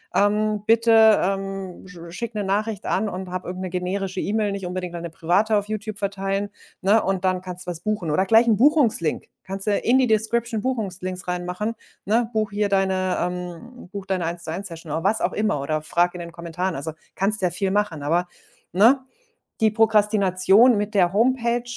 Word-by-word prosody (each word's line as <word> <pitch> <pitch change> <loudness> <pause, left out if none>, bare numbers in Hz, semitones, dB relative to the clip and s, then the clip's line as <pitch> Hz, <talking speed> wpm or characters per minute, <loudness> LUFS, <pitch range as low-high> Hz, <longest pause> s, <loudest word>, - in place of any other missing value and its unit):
ähm: 210 0 +1
„Bitte, 225 -1 +5
ähm, 195 -1 -3
sch 180 -1 -13
schicke 225 +5 -6
'ne 205 - -2
Nachricht 205 +1 -2
an”, 205 +2 0
und 185 0 -6
habe 185 0 -5
irgend 185 +1 -5
'ne 185 - -4
generische 185 +1 -3
E-Mail, 210 -1 -1
nicht 195 -2 -5
unbedingt 180 -1 -4
deine 170 0 -5
private 185 +7 +1
auf 205 - -1
YouTube 215 -1 -5
verteilen, 195 0 -2 0.3
ne, 205 +4 +3
„und 190 0 -1
dann 185 -1 +1
kannst 180 0 -7
du - - -1
was 170 0 -8
buchen”, 210 -6 -2
oder 190 +5 +2
gleich 225 +4 +5
'nen 220 - +4
Buchungslink. 240 - +2 0.2
Kannst 195 +2 -3
du - - +3
in 250 +3 +2
die 260 -2 +3
Description 220 +1 0
Buchungslinks 185 -7 -3
reinmachen, 180 +5 -3 0.3
ne: 225 +3 +1
„Buche 215 -2 -2
hier 205 -1 +1
deine 190 -1 +1
ähm, 180 +6 -6
buche 200 -1 -7
deine 185 -3 -1
Eins-zu-eins-Session”, 170 0 -5
oder 165 - -2
was 210 +3 +2
auch - - -1
immer, 210 -8 0
oder 155 +2 -2
frage 175 +3 +1
in 180 - -7
den 170 0 -8
Kommentaren. 170 +2 -4
Also, 155 +3 -5 0.2
kannst 205 +2 +2
ja 180 - +2
viel 190 +2 -1
machen, 200 -8 -1
aber, 170 +4 +1 0.4
ne, 230 +9 +5 0.6
die 220 -1 +4
Prokrastination 210 0 +4
mit 210 +1 -2
der 180 -2 +4
Homepage 240 +1 +1
195 Hz, 185 wpm, -23 LUFS, 180-215 Hz, 0.6 s, Bitte